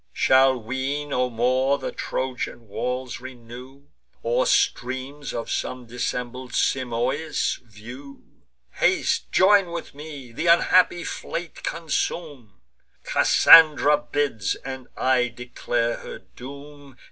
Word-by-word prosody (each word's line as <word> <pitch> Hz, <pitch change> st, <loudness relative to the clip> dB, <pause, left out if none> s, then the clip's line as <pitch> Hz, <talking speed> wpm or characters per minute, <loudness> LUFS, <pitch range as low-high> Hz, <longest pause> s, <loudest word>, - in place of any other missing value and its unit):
Shall 130 Hz, 0 st, +4 dB
we 130 Hz, +5 st, -3 dB
no 125 Hz, -3 st, -1 dB
more 130 Hz, +4 st, +1 dB
the -, -, -5 dB
Trojan 125 Hz, -3 st, -4 dB
walls 125 Hz, +4 st, -4 dB
renew, 125 Hz, +2 st, -11 dB, 0.4 s
Or -, -, +1 dB
streams 130 Hz, +3 st, -1 dB
of 115 Hz, -, -5 dB
some 125 Hz, -1 st, -3 dB
dissembled 125 Hz, +1 st, -5 dB
Simois 130 Hz, +4 st, -1 dB
view! 120 Hz, +5 st, -12 dB, 0.5 s
Haste, -, -, 0 dB
join 195 Hz, -1 st, +5 dB
with 170 Hz, -1 st, -6 dB
me, 145 Hz, -4 st, -10 dB
th' 160 Hz, +8 st, -3 dB
unhappy 175 Hz, +1 st, +4 dB
fleet 170 Hz, 0 st, -6 dB
consume! 150 Hz, -, -4 dB, 0.4 s
Cassandra 155 Hz, -2 st, +6 dB
bids; 145 Hz, -9 st, -2 dB
and 130 Hz, -1 st, -7 dB
I 130 Hz, -1 st, +2 dB
declare 120 Hz, -1 st, -3 dB
her -, -, -9 dB
doom. 140 Hz, +1 st, -13 dB
130 Hz, 105 wpm, -24 LUFS, 125-145 Hz, 0.5 s, Cassandra